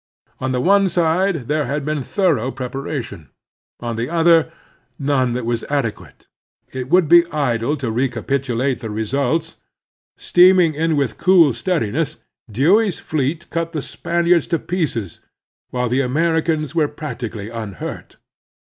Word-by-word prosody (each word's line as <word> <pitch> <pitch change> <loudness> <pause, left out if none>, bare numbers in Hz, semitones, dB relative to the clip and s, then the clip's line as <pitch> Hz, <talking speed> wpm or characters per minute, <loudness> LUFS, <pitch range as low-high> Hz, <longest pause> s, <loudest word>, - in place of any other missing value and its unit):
On 130 0 -2
the 125 - 0
one 195 +3 +4
side 170 -4 +1
there 150 -2 0
had 140 +2 -2
been 150 -1 -1
thorough 145 - 0
prepara 135 +2 -4
tion; 90 - -11 0.5
on 120 -1 -4
the 115 +4 -2
other, 165 -1 +3 0.5
none 135 -3 +1
that 125 -1 -3
was 120 -1 -1
adequate. 140 -7 -4 0.5
It 130 0 -5
would 180 -1 +4
be 170 +2 +6
idle 140 -1 0
to 125 -5 -3
recapitulate 130 +1 -1
the 115 -3 -6
results. 140 +9 -1 0.6
Steam 185 +1 +5
ing 165 -3 +3
in 160 +1 0
with 125 -7 -1
cool 175 -7 +5
steadiness, 155 - -1 0.3
Dewey's 180 - +3
fleet 155 +2 -2
cut 165 0 -2
the 155 - -2
Spaniards 170 -1 +1
to 170 - +1
pieces, 150 - -3 0.5
while 125 0 -1
the 125 +3 +1
Americans 160 +2 0
were 160 -3 +2
practically 115 -8 -6
unhurt. 110 -4 -7
145 Hz, 140 wpm, -19 LUFS, 125-165 Hz, 0.6 s, be